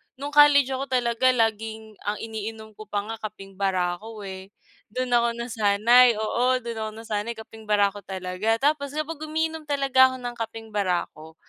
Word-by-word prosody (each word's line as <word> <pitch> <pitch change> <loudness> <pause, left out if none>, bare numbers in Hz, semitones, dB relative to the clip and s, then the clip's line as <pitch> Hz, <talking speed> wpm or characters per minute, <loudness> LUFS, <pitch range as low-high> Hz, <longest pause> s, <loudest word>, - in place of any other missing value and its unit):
no'ng 285 +2 -6
college 290 -2 +6
ako 265 +1 -2
talaga 245 -1 +1
laging 220 -1 -2
ang 205 - 0
iniinom 220 0 -6
ko 215 0 -12
pa 205 -1 -2
nga 225 +1 -6
kapeng 195 -2 -9
barako, 195 +3 -2
eh. 190 -1 -8 0.5
Do'n 255 -1 -2
ako 235 -1 +3
nasanay. 235 +1 +4
Oo, 240 +4 +1
do'n 235 -1 -5
ako 220 0 -3
nasanay, 220 +1 -3
kapeng 220 0 -12
barako 205 -1 +2
talaga. 190 +3 -2 0.2
Tapos 280 -1 -7
kapag 310 0 -3
umiinom 320 0 -2
talaga 275 -2 +4
ako - - -5
ng 240 0 -4
kapeng 225 0 -6
barako, 175 -5 -2
225 Hz, 160 wpm, -25 LUFS, 205-255 Hz, 0.5 s, college